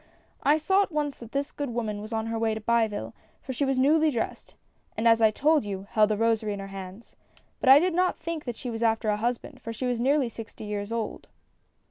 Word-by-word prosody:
I 295 +2 +4
saw 380 +6 +3
at 395 - -1
once 295 -3 -2
that 235 -1 -11
this 280 +1 -2
good 285 -2 -4
woman 220 -3 -3
was 215 +2 -8
on 220 -1 -1
her 225 0 -2
way 225 -1 +1
to - - -4
Biville, 215 - 0 0.3
for 260 - -6
she 280 +3 0
was 270 -1 0
newly 310 +4 +4
dressed, 235 -6 -4 0.4
and 225 +2 +2
as 230 0 +5
I 220 - +7
told 295 +6 +2
you, 195 -2 -5
held 215 -1 +4
a 210 - +1
rosary 225 -1 +1
in 200 - -6
her 195 0 -7
hands. 195 +3 -9 0.4
But 260 - +2
I 270 - +11
did 355 +4 +2
not 365 +1 +1
think 335 -2 -5
she 245 +1 -5
was 225 0 -5
after 225 -1 +1
a 210 - +1
husband, 235 +2 -3
for 230 - -5
she 230 +3 -4
was 245 -2 0
nearly 270 +2 +2
sixty 225 -1 -9
years 210 0 -4
old. 230 -1 -4
230 Hz, 235 wpm, -27 LUFS, 215-280 Hz, 0.4 s, I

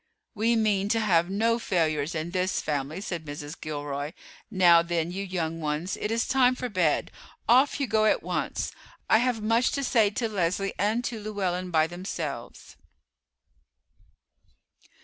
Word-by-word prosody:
"We 230 +1 +2
mean 205 -3 +1
to 225 - +2
have 175 -5 +2
no 225 +4 +1
failures 160 -5 0
in 160 +2 -3
this 185 0 0
family," 150 +3 -3
said 175 -5 -4
Mrs. 145 0 -7
Gilroy. 145 0 -4 0.4
"Now, 175 -5 +6
then, 170 0 -1
you 195 +2 -4
young 165 -4 -3
ones, 155 +5 -2
it 210 - -3
is 230 +2 0
time 255 -1 +4
for 250 0 -4
bed; 180 -7 +1 0.4
off 260 +5 +4
you 280 - +1
go 220 -2 +2
at 215 - +2
once. - - -2 0.4
I 220 - +5
have 240 -3 0
much 230 +3 +3
to 280 - -1
say 225 -5 +3
to 225 +3 -2
Leslie 195 -1 -1
and 215 +5 +1
to 235 -2 -3
Llewellyn 190 -4 -2
by 160 -2 +3
themselves." 165 -7 -6
185 Hz, 155 wpm, -27 LUFS, 165-220 Hz, 0.4 s, Now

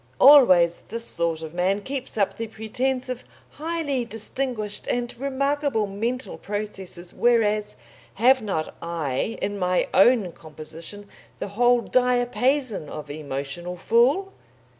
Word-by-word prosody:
Always 185 -12 +7
this 230 +1 -4
sort 165 -4 -1
of 160 0 -7
man 185 +3 +1
keeps 265 -2 -4
up 200 -2 +1
the 230 - -4
pretence 250 +4 -2
of 255 -1 -5 0.3
highly 310 -4 -2
distinguished 225 -1 -4
and 240 0 -2
remarkable 275 -3 0
mental 230 +6 -3
processes, 195 -4 -6
whereas 215 -3 +2 0.4
have 255 +4 +5
not 190 -7 -3
I, 165 - -2
in 200 0 -2
my 180 0 +1
own 205 -2 +5
composition, 160 +6 -9 0.3
the - - -5
whole 245 +4 +3
diapason 250 - +1
of 150 -1 -7
emotional 145 +4 -5
fool? 260 - +2
220 Hz, 120 wpm, -24 LUFS, 180-255 Hz, 0.4 s, Always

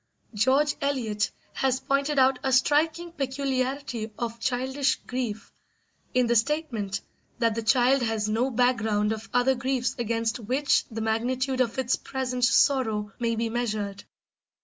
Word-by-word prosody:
George 265 +7 +2
Eliot 235 -7 0 0.2
has 260 -1 +1
pointed 280 +1 0
out 260 -1 +4
a 265 - 0
striking 315 +6 +2
peculiarity 265 -4 -2
of 235 -1 -4
childish 265 +3 0
grief 245 -4 -4 0.6
in 250 -1 +4
the 235 0 +1
statement 230 -6 0 0.4
that 230 -2 +2
the 230 - -2
child 250 +3 +3
has 225 -2 0
no 225 +5 +1
background 220 -4 +1
of 220 0 -5
other 245 +2 +3
griefs 260 0 -1
against 230 0 -1
which 260 +6 +1
the 225 -1 -5
magnitude 255 +4 0
of 235 -1 0
its 260 -1 +1
present 255 -2 -3
sorrow 220 -7 +2
may 230 -1 0
be 230 +1 -1
measured. 215 -4 -3
250 Hz, 140 wpm, -26 LUFS, 225-265 Hz, 0.6 s, out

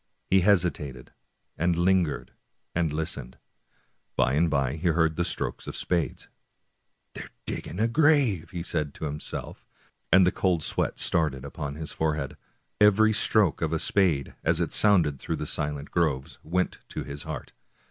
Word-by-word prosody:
He 95 0 +6
hesitated, 85 -9 +1 0.5
and 85 +2 +2
lingered, 85 -3 +1 0.4
and 85 -3 +1
listened. 75 -5 -4 0.8
By 60 - +2
and 80 +4 +3
by 70 -1 0
he 85 +3 -1
heard 80 -1 +2
the 85 - +1
strokes 90 - -3
of - - -5
spades. 85 -3 -1 0.4
" - - -48
They - - -6
are - - -9 0.2
dig - - -4
ging - - -7
the 110 +5 +2
grave! 125 - +3
" 85 - -3
said 75 -4 -1
he - - -15
to - - -6
himself, 75 0 -6 0.5
and 95 -1 +7
the 90 - +3
cold 90 -4 +1
sweat - - -1
started 70 -5 0
upon 70 0 -5
his 80 +1 -5
forehead. 75 -3 -1 0.4
Every 105 +1 +5
stroke 105 -4 +2
of 80 -1 0
a 80 - +1
spade, 80 -6 +1
as - - +2
it - - -1
sounded 85 -10 +4
through 80 - -3
the 75 - -4
silent 75 -1 -3
groves, 75 -6 -1
went 90 +3 -1
to - - -4
his 70 0 -7
heart. 80 -3 -7
80 Hz, 170 wpm, -27 LUFS, 75-90 Hz, 0.8 s, and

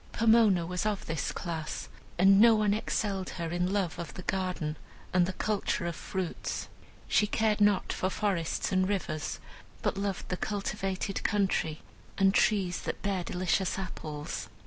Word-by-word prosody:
Pomona 220 -6 +5
was 180 +1 -2
of 210 -2 -1
this 155 -4 -2
class, 165 -4 -4 0.3
and 195 +3 +7
no 230 0 +8
one 210 -1 +3
excelled 200 -3 -1
her 170 -2 -2
in 175 +1 0
love 190 -5 -1
of 170 - -6
the 185 - -7
garden 180 -5 -1 0.4
and 180 -1 +4
the 190 - -3
culture 205 -3 -1
of 170 -1 -2
fruit. 185 0 -4 0.4
She 210 - +3
cared 215 -1 +1
not 205 -2 +3
for 185 - 0
forests 190 -4 -1
and 185 0 +2
rivers, 180 -6 -2 0.4
but - - 0
loved 200 -2 -3
the 185 - -1
cultivated 195 -1 -2
country, 195 -7 0 0.3
and 195 -1 +4
trees 195 -5 +2
that - - -4
bear 195 -3 0
delicious 185 +2 0
apples. 155 -6 -5
190 Hz, 155 wpm, -30 LUFS, 175-205 Hz, 0.4 s, no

